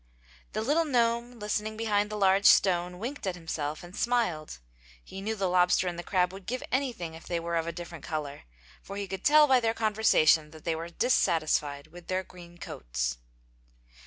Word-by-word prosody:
The 215 Hz, -, -1 dB
little 300 Hz, +7 st, +2 dB
gnome 240 Hz, -3 st, 0 dB
listening 210 Hz, 0 st, -3 dB
behind 210 Hz, -2 st, +1 dB
the 215 Hz, -, -5 dB
large 195 Hz, -1 st, +4 dB
stone 180 Hz, -1 st, +4 dB
winked 235 Hz, +2 st, -5 dB
at 185 Hz, -, -1 dB
himself 155 Hz, -3 st, -4 dB
and 175 Hz, +2 st, -11 dB
smiled. 215 Hz, -, -1 dB, 0.5 s
He 190 Hz, -, -9 dB
knew 220 Hz, +2 st, -2 dB
the 195 Hz, -3 st, -1 dB
lobster 180 Hz, 0 st, +3 dB
and 175 Hz, -1 st, -3 dB
the -, -, -2 dB
crab 180 Hz, 0 st, 0 dB
would 190 Hz, -1 st, -11 dB
give 255 Hz, +2 st, -3 dB
anything 245 Hz, -11 st, -2 dB
if 160 Hz, -, -12 dB
they 170 Hz, -, -1 dB
were 170 Hz, 0 st, -3 dB
of 165 Hz, 0 st, -1 dB
a -, -, -1 dB
different 170 Hz, -2 st, -9 dB
color, 150 Hz, -3 st, -5 dB, 0.4 s
for 200 Hz, -, -8 dB
he 200 Hz, -1 st, -4 dB
could 190 Hz, +1 st, -6 dB
tell 300 Hz, 0 st, +7 dB
by 265 Hz, -3 st, +4 dB
their 225 Hz, -1 st, 0 dB
conversation 210 Hz, -8 st, +3 dB
they 160 Hz, +1 st, -4 dB
were 165 Hz, +1 st, -6 dB
dissatisfied 155 Hz, -, +1 dB
with 175 Hz, 0 st, -13 dB
their 185 Hz, 0 st, -1 dB
green 175 Hz, -2 st, -14 dB
coats. -, -, -4 dB
185 Hz, 190 wpm, -28 LUFS, 165-220 Hz, 0.5 s, tell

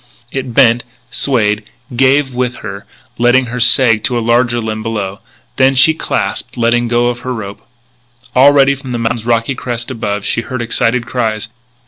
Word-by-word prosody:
It 130 Hz, -3 st, -5 dB
bent, 120 Hz, -3 st, +4 dB, 0.3 s
swayed, 110 Hz, -5 st, +1 dB, 0.3 s
gave 135 Hz, +1 st, +2 dB
with 125 Hz, 0 st, -1 dB
her, 100 Hz, -1 st, -7 dB, 0.3 s
letting 120 Hz, +2 st, +4 dB
her 125 Hz, -, -3 dB
sag 115 Hz, -2 st, +4 dB
to 125 Hz, -, -1 dB
a -, -, +1 dB
larger 120 Hz, +1 st, +1 dB
limb 110 Hz, -1 st, -3 dB
below. 105 Hz, -3 st, -4 dB, 0.4 s
This 135 Hz, 0 st, +3 dB
she 160 Hz, +5 st, +6 dB
clasped, 160 Hz, -, -3 dB
letting 120 Hz, 0 st, +2 dB
go 120 Hz, +1 st, +1 dB
her 125 Hz, +1 st, -6 dB
rope. 100 Hz, -3 st, -7 dB, 0.7 s
Already, 140 Hz, +1 st, +5 dB
from 135 Hz, -2 st, -7 dB
the -, -, -1 dB
mountain's 115 Hz, 0 st, -2 dB
rocky 115 Hz, +2 st, +1 dB
crest 120 Hz, -1 st, -4 dB
above, 105 Hz, -4 st, -3 dB
she -, -, 0 dB
heard 130 Hz, +2 st, -5 dB
excited 120 Hz, +1 st, 0 dB
cries. 115 Hz, -3 st, -2 dB
120 Hz, 160 wpm, -14 LUFS, 115-130 Hz, 0.7 s, she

